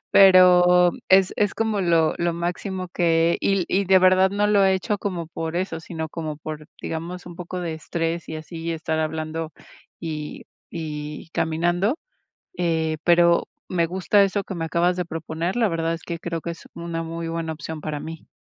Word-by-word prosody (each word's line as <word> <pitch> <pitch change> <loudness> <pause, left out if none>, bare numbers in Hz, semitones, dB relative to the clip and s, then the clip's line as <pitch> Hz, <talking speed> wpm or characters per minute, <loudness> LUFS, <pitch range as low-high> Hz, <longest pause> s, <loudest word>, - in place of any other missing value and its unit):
Pero 180 -2 +7 0.2
es 190 0 +5
es 205 -2 +1
como 220 -2 0
lo 165 -3 +3
lo 170 0 +1
máximo 185 +2 -3
que 170 -1 +2
y - - +2
l 195 -2 +1
y 200 +2 +1
de 190 +1 +6
verdad 185 +1 +5
no 205 +1 +1
lo 205 -1 +4
he 190 - +4
hecho 205 +3 -1
como 180 -5 -3
por 165 +1 -4
eso, 180 -2 -2
sino 160 -1 -5
como 155 -2 -5
por, 155 0 -7
digamos, 170 +3 -5
un 175 -1 -9
poco 180 +1 -5
de 165 -2 -3
estrés 165 +1 -3
y 160 - -4
así, 160 +2 -8
y 170 - -1
estar 160 -1 -2
hablando 155 0 -3 0.5
y 155 -2 -5 0.3
y 150 -1 -6
caminando. 175 - +1 0.6
Eh, 160 -2 0
pero 170 0 +4 0.2
me 170 -2 +1
gusta 190 +4 +3
eso 200 +1 0
que 190 - -6
me 165 -1 -2
acabas 170 +2 +1
de 180 - -1
proponer. 165 +2 -3
La 235 -2 +3
verdad 165 -1 -1
es 165 - -6
que 170 - -4
creo 170 -1 -4
que 170 - -5
es 170 - -11
una 170 -1 -4
muy 165 0 -5
buena 165 -1 -3
opción 155 0 -7
para 150 -1 -4
mí. 165 0 -8
170 Hz, 190 wpm, -23 LUFS, 160-185 Hz, 0.6 s, Pero